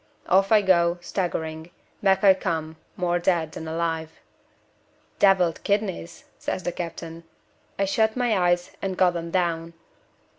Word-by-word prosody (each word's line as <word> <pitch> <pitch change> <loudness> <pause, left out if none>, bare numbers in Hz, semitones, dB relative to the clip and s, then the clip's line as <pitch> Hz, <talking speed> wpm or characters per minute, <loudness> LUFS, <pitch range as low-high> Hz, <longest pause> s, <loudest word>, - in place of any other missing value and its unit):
Off 195 +2 +3
I 215 -2 +6
go, 170 -2 +3
staggering 160 -3 -3 0.3
back 195 -1 +3
I 195 -1 +8
come, 160 -4 -3 0.2
more 175 -1 0
dead 170 -3 +1
than 160 - -7
alive. 160 -1 -2 1.1
'Deviled 185 -4 +3
kidneys,' 200 -4 -2 0.2
says 185 - -3
the 175 - -1
captain. 165 -1 -7 0.5
I 195 - +1
shut 220 +4 +1
my 245 -3 +2
eyes, 175 -1 +1
and 190 -2 -3
got 180 -1 +3
'em 170 0 -4
down. 170 -2 -1
175 Hz, 140 wpm, -25 LUFS, 165-190 Hz, 1.1 s, I